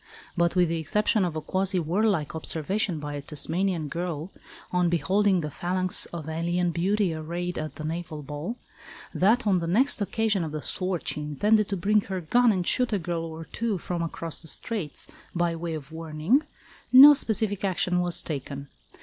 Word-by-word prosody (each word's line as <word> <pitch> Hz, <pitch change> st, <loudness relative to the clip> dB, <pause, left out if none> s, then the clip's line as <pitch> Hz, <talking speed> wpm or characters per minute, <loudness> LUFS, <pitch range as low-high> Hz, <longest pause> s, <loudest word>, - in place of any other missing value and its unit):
But 170 Hz, 0 st, +1 dB
with 180 Hz, -2 st, +3 dB
the 165 Hz, 0 st, -1 dB
exception 210 Hz, +6 st, +2 dB
of 175 Hz, -3 st, -2 dB
a 155 Hz, -, -2 dB
quasi 190 Hz, +3 st, 0 dB
warlike 175 Hz, -1 st, +1 dB
observation 165 Hz, +3 st, 0 dB
by 145 Hz, 0 st, -5 dB
a 145 Hz, -, -4 dB
Tasmanian 160 Hz, +3 st, -1 dB
girl, 170 Hz, +1 st, -4 dB, 0.4 s
on 180 Hz, -1 st, +2 dB
beholding 190 Hz, +2 st, +2 dB
the 150 Hz, -1 st, -4 dB
phalanx 185 Hz, +3 st, -1 dB
of 165 Hz, -3 st, -7 dB
alien 170 Hz, +2 st, 0 dB
beauty 185 Hz, +2 st, +1 dB
arrayed 170 Hz, +3 st, -4 dB
at 155 Hz, 0 st, -5 dB
the 155 Hz, -, -7 dB
naval 160 Hz, -1 st, -4 dB
ball, 150 Hz, -, -5 dB, 0.6 s
that 225 Hz, +6 st, +3 dB
on 195 Hz, -3 st, +3 dB
the 165 Hz, -, -3 dB
next 230 Hz, +7 st, +2 dB
occasion 210 Hz, -2 st, +1 dB
of 155 Hz, -2 st, -5 dB
the 155 Hz, -, -2 dB
sort 185 Hz, -2 st, -2 dB
she 150 Hz, -, -1 dB
intended 205 Hz, +9 st, +2 dB
to 200 Hz, -, -1 dB
bring 210 Hz, +4 st, +3 dB
her 190 Hz, -2 st, -4 dB
gun 240 Hz, +8 st, +3 dB
and 185 Hz, -3 st, -1 dB
shoot 250 Hz, +4 st, +2 dB
a 210 Hz, -, +2 dB
girl 170 Hz, -2 st, -3 dB
or 160 Hz, 0 st, -7 dB
two 230 Hz, 0 st, -2 dB
"from 175 Hz, 0 st, -4 dB
across 165 Hz, -1 st, -4 dB
the -, -, -8 dB
Straits" 180 Hz, -2 st, -3 dB, 0.3 s
by 170 Hz, -1 st, +1 dB
way 165 Hz, 0 st, -4 dB
of 150 Hz, -1 st, -8 dB
warning, 160 Hz, -, +1 dB, 0.5 s
no 275 Hz, +3 st, +11 dB
specific 215 Hz, -6 st, 0 dB
action 180 Hz, -2 st, +1 dB
was 175 Hz, -1 st, +1 dB
taken. 140 Hz, -2 st, -5 dB
175 Hz, 185 wpm, -26 LUFS, 160-195 Hz, 0.6 s, no